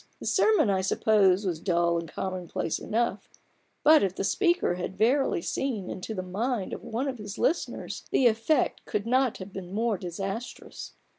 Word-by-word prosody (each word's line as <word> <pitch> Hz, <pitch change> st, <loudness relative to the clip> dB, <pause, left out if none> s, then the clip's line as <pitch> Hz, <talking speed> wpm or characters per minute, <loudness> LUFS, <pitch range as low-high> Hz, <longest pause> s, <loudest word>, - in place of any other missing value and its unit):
The -, -, -8 dB
sermon 430 Hz, -, +3 dB
I 190 Hz, -1 st, +1 dB
suppose, 195 Hz, 0 st, +3 dB
was 175 Hz, -4 st, -1 dB
dull 170 Hz, -1 st, +1 dB
and 165 Hz, -1 st, -7 dB
commonplace 185 Hz, -4 st, -3 dB
enough, 225 Hz, -2 st, -1 dB, 0.5 s
but 310 Hz, +1 st, +7 dB
if 190 Hz, -2 st, 0 dB
the -, -, -2 dB
speaker 345 Hz, -, +2 dB
had 180 Hz, +1 st, -5 dB
verily 240 Hz, -5 st, +2 dB
seen 225 Hz, -9 st, -2 dB
into 215 Hz, +4 st, -5 dB
the 185 Hz, -, -3 dB
mind 205 Hz, +3 st, -2 dB
of -, -, -5 dB
one 240 Hz, +5 st, -2 dB
of 255 Hz, -3 st, -4 dB
his 205 Hz, -1 st, -7 dB
listeners, 335 Hz, +5 st, -1 dB
the 265 Hz, -, +2 dB
effect 235 Hz, +5 st, +2 dB
could 205 Hz, 0 st, -2 dB
not 255 Hz, 0 st, +2 dB
have 190 Hz, +1 st, -9 dB
been 185 Hz, -2 st, -7 dB
more 220 Hz, -1 st, 0 dB
disastrous. 195 Hz, +6 st, -6 dB
205 Hz, 170 wpm, -27 LUFS, 185-245 Hz, 0.5 s, but